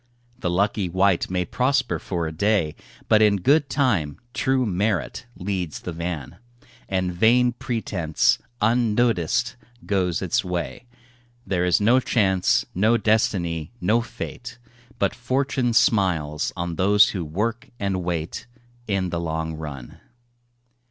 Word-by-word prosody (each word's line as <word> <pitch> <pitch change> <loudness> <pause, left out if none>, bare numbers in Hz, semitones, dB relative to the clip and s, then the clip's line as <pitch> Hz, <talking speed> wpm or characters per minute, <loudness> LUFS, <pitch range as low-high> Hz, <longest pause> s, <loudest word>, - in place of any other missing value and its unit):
The 90 - -1
lucky 100 +1 0
wight 95 0 +2
may 90 -1 -1
prosper 130 +7 0
for 85 -3 -3
a 80 - -3
day, 90 -2 +1 0.3
But 110 - +5
in 105 -1 +5
good 140 - +2
time 115 - 0 0.2
true 130 -2 +1
merit 105 +4 -1
leads 90 -4 -3
the 90 - -5
van 85 -4 -5 0.5
And 95 -2 -1
vain 120 +7 +4
pretence, 110 - 0 0.2
unnoticed, 115 -1 +1 0.3
goes 90 -4 0
its - - +1
way. 90 +6 -4 0.6
There 90 -2 0
is 90 -2 +3
no 115 +5 +4
Chance, 95 -7 +2
no 110 +6 +3
Destiny, 95 -6 0
no 110 +6 +2
Fate, 120 +1 -7 0.4
But - - +1
Fortune 130 +1 0
smiles 95 -10 +2
on 85 -1 -3
those 105 +2 +5
who 95 -4 -3
work 105 +9 -3
and 95 -2 -1
wait, 85 +1 -3 0.4
In 95 -3 -1
the 85 - -1
long 80 -1 -3
run. 75 -5 -8
100 Hz, 130 wpm, -23 LUFS, 85-115 Hz, 0.6 s, But